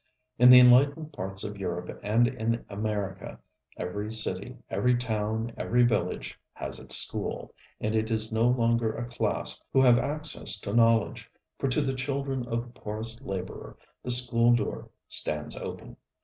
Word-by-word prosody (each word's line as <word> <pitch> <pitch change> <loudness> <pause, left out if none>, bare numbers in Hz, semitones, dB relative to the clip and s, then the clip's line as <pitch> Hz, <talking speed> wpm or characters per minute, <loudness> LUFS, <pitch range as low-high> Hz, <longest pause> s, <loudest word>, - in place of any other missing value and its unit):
In 125 +1 +8
the 125 0 +11
enlightened 140 +5 +5
parts 95 +1 -5
of 105 -1 -5
Europe 90 -1 -4
and 110 +4 +3
in 115 0 -2
America 105 -2 -4 0.4
every 105 +4 -4
city, 110 -1 -2
every 120 +6 +2
town, 110 0 -2
every 120 +1 +2
village, 120 -2 -1
has - - -6
its - - -2
school; - - -2 0.3
and 110 - -1
it 110 0 0
is 110 -1 -1
no 110 +2 +2
longer 115 -2 +2
a 120 - -4
class 120 - -2
who 135 - +4
have 120 -2 +6
access 150 -7 -2
to 100 - -4
knowledge, 115 -2 +2 0.3
for - - 0
to 130 +4 +2
the 135 -2 -1
children 135 -1 -3
of 115 0 -1
the - - -21
poorest 110 +3 -6
laborer 95 -8 -6 0.2
the - - -6
school 120 -1 +3
door 110 -3 -3 0.2
stands 75 0 -2
open. - - -7
115 Hz, 160 wpm, -28 LUFS, 105-125 Hz, 0.4 s, the